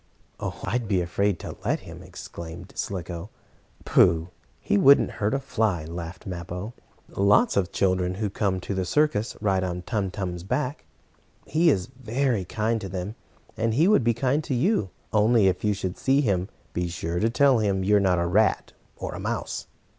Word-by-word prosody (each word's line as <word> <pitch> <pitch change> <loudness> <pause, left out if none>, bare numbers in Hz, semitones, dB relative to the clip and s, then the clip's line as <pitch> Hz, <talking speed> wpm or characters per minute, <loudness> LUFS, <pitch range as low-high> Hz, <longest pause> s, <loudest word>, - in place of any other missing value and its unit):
"Oh, - - -4
I'd 120 -1 -1
be 100 -3 +2
afraid 95 +2 0
to - - -6
let - - 0
him!" - - -10
exclaimed 85 +2 -9
Slicko. 90 -1 -4 0.6
"Pooh! 80 +1 +4 0.3
He - - 0
wouldn't 135 +7 +6
hurt 105 +6 +2
a - - 0
fly!" 110 - -1
laughed 85 +2 -7
Mappo. 90 +4 -5 0.4
"Lots 100 +1 +3
of 100 - +3
the - - -30
children 90 -1 +1
who 105 +2 -1
come 100 -2 0
to 100 - -4
the 95 -1 -1
circus 110 - +1
ride 95 -3 +1
on 90 -1 -3
Tum 105 -4 -1
Tum's 90 -2 -4
back. 125 - -2 0.6
He 165 +2 +3
is 95 - +2
very 125 -3 -1
kind 110 +4 -1
to 95 - -5
them, 95 +2 -4 0.4
and 110 0 0
he 160 +7 +4
would 205 - +4
be 115 0 +2
kind 135 +5 +1
to 135 - -1
you. 125 - +1 0.2
Only, 110 0 +4
if 95 -1 +1
you 105 -1 +2
should 95 -2 -4
see 135 +2 +3
him, 95 -7 0 0.2
be 90 0 -1
sure 85 0 -3
to 110 - +2
tell 135 0 +4
him 100 -3 +1
you're 105 +2 +4
not 95 -2 +2
a 85 - +1
rat 100 +4 +2 0.2
or - - -5
a - - -6
mouse." - - -3
100 Hz, 185 wpm, -25 LUFS, 90-115 Hz, 0.6 s, wouldn't